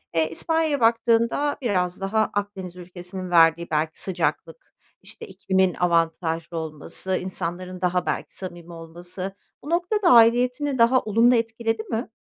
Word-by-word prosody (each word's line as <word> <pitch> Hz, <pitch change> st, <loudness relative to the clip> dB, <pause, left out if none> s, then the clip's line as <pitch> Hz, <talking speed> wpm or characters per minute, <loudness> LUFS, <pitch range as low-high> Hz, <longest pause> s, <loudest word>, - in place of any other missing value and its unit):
eee, 160 Hz, -1 st, +2 dB
İspanya'ya 315 Hz, -, 0 dB
baktığında 230 Hz, +4 st, +2 dB
biraz 185 Hz, -6 st, -1 dB
daha 215 Hz, +2 st, 0 dB
Akdeniz 200 Hz, -3 st, -4 dB
ülkesinin 180 Hz, +1 st, -8 dB
verdiği 165 Hz, 0 st, +4 dB
belki 155 Hz, +1 st, -1 dB
sıcaklık, 185 Hz, -, -2 dB, 0.3 s
işte, -, -, -11 dB
ikliminin 190 Hz, -1 st, 0 dB
avantajlı 165 Hz, -1 st, -1 dB
olması, 160 Hz, +4 st, -2 dB
insanların 180 Hz, 0 st, -5 dB
daha 180 Hz, 0 st, 0 dB
belki -, -, -3 dB
samimi 175 Hz, -2 st, -7 dB
olması, 175 Hz, +3 st, -7 dB, 0.3 s
bu 295 Hz, -, -8 dB
noktada 360 Hz, +2 st, +1 dB
aidiyetini 250 Hz, +4 st, +4 dB
daha 240 Hz, +2 st, +5 dB
olumlu 230 Hz, +3 st, +3 dB
etkiledi 225 Hz, -1 st, -1 dB
mi? 225 Hz, 0 st, -4 dB
190 Hz, 125 wpm, -23 LUFS, 175-230 Hz, 0.3 s, daha